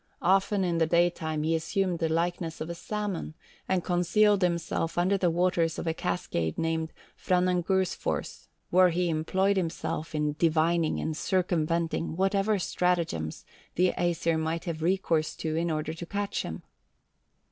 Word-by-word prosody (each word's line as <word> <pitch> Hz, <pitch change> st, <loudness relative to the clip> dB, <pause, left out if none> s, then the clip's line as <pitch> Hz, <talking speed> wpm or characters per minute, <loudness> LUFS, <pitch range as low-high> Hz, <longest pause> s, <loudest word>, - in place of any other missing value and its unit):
Often 195 Hz, +2 st, +3 dB
in 170 Hz, -2 st, 0 dB
the 160 Hz, -, +3 dB
daytime 160 Hz, -2 st, +1 dB
he 160 Hz, +1 st, +1 dB
assumed 175 Hz, +2 st, 0 dB
the 165 Hz, -, 0 dB
likeness 165 Hz, 0 st, -1 dB
of 160 Hz, +2 st, -4 dB
a -, -, -3 dB
salmon, 195 Hz, -3 st, -4 dB, 0.3 s
and 185 Hz, -2 st, +1 dB
concealed 190 Hz, +4 st, +3 dB
himself 170 Hz, -2 st, -1 dB
under 180 Hz, +3 st, +3 dB
the 185 Hz, -3 st, +2 dB
waters 170 Hz, -1 st, +1 dB
of -, -, -4 dB
a 165 Hz, -, 0 dB
cascade 85 Hz, -, -2 dB
called 160 Hz, 0 st, -1 dB, 0.2 s
Franangursfors, 180 Hz, 0 st, 0 dB, 0.2 s
where 185 Hz, 0 st, +6 dB
he 175 Hz, +1 st, 0 dB
employed 190 Hz, +5 st, +1 dB
himself 165 Hz, -2 st, -3 dB
in 150 Hz, -1 st, 0 dB
divining 165 Hz, 0 st, +2 dB
and 160 Hz, -, -2 dB
circumventing 170 Hz, -2 st, 0 dB
whatever 195 Hz, +3 st, +2 dB
stratagems 170 Hz, -, -1 dB, 0.3 s
the 180 Hz, +1 st, +3 dB
Æsir 165 Hz, -2 st, 0 dB
might 160 Hz, +2 st, -2 dB
have 165 Hz, -3 st, -4 dB
recourse 165 Hz, -3 st, +1 dB
to 155 Hz, -1 st, -3 dB
in 170 Hz, +1 st, 0 dB
order 155 Hz, 0 st, -2 dB
to 165 Hz, +2 st, -7 dB
catch 200 Hz, +1 st, -2 dB
him. -, -, -6 dB
170 Hz, 145 wpm, -28 LUFS, 160-185 Hz, 0.3 s, where